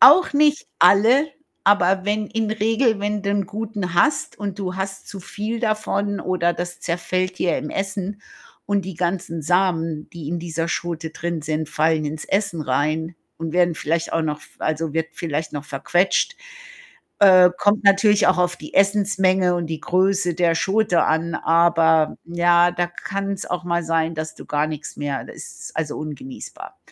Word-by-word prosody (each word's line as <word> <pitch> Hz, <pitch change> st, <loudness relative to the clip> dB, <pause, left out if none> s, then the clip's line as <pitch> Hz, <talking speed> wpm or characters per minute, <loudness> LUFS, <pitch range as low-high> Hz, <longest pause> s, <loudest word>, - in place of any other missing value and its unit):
Auch 360 Hz, +7 st, +8 dB
nicht 300 Hz, +1 st, +3 dB
alle, 225 Hz, -, +5 dB, 0.4 s
aber 190 Hz, -1 st, +3 dB
wenn 210 Hz, +1 st, 0 dB
in 225 Hz, -1 st, -2 dB
Regel 220 Hz, +1 st, +1 dB
wenn 205 Hz, 0 st, -2 dB
du 200 Hz, -, -1 dB
'n 200 Hz, -1 st, 0 dB
guten 205 Hz, -3 st, -4 dB
hast 175 Hz, -, +1 dB
und 200 Hz, -2 st, -5 dB
du 185 Hz, -2 st, -4 dB
hast 195 Hz, 0 st, -5 dB
zu 200 Hz, -, -7 dB
viel 215 Hz, +5 st, -4 dB
davon 210 Hz, -2 st, -1 dB
oder 175 Hz, -2 st, 0 dB
das 175 Hz, 0 st, -5 dB
zerfällt 185 Hz, +2 st, -2 dB
dir 175 Hz, -, +1 dB
im 150 Hz, -, -6 dB
Essen 195 Hz, +1 st, -3 dB, 0.5 s
und 200 Hz, -2 st, 0 dB
die 190 Hz, -, -6 dB
ganzen 175 Hz, -1 st, -2 dB
Samen, 165 Hz, -3 st, 0 dB
die 160 Hz, -4 st, -8 dB
in 175 Hz, -, -2 dB
dieser 165 Hz, 0 st, -3 dB
Schote 170 Hz, -2 st, -3 dB
drin 170 Hz, -1 st, -4 dB
sind, 155 Hz, 0 st, -2 dB
fallen 155 Hz, 0 st, +1 dB
ins 155 Hz, +1 st, -4 dB
Essen 195 Hz, -4 st, -1 dB
rein 155 Hz, +5 st, -1 dB, 0.2 s
und 165 Hz, -1 st, -5 dB
werden 175 Hz, -1 st, +3 dB
vielleicht 165 Hz, +2 st, -2 dB
auch 165 Hz, -, +1 dB
noch 150 Hz, -1 st, -2 dB
f -, -, -14 dB
also, 155 Hz, -1 st, -2 dB
wird 160 Hz, 0 st, -1 dB
vielleicht 160 Hz, -2 st, -3 dB
noch 145 Hz, -1 st, -5 dB
verquetscht 175 Hz, -, 0 dB, 0.8 s
äh, 185 Hz, -2 st, +8 dB
kommt 205 Hz, +1 st, +2 dB
natürlich 200 Hz, +1 st, +5 dB
auch 185 Hz, -, +4 dB
auf 180 Hz, 0 st, +1 dB
die 150 Hz, -, -11 dB
Essens-Menge 190 Hz, -2 st, +3 dB
und 170 Hz, -2 st, -2 dB
die 160 Hz, -1 st, -4 dB
Größe 185 Hz, -1 st, +1 dB
der 170 Hz, -1 st, +2 dB
Schote 190 Hz, 0 st, +2 dB
an, 160 Hz, +1 st, 0 dB
aber 165 Hz, -2 st, +3 dB
ja, 175 Hz, 0 st, +3 dB
da 175 Hz, 0 st, 0 dB
kann's 195 Hz, +2 st, -4 dB
auch 180 Hz, 0 st, -3 dB
mal 170 Hz, 0 st, 0 dB
sein, 165 Hz, 0 st, 0 dB
dass 155 Hz, 0 st, -5 dB
du -, -, -12 dB
gar 150 Hz, +1 st, 0 dB
nix 155 Hz, -1 st, -7 dB
mehr 145 Hz, -2 st, -3 dB
da -, -, -11 dB
ist -, -, -10 dB
also 155 Hz, -2 st, -2 dB
ungenießbar. 145 Hz, -4 st, -8 dB
175 Hz, 175 wpm, -22 LUFS, 160-200 Hz, 0.8 s, Auch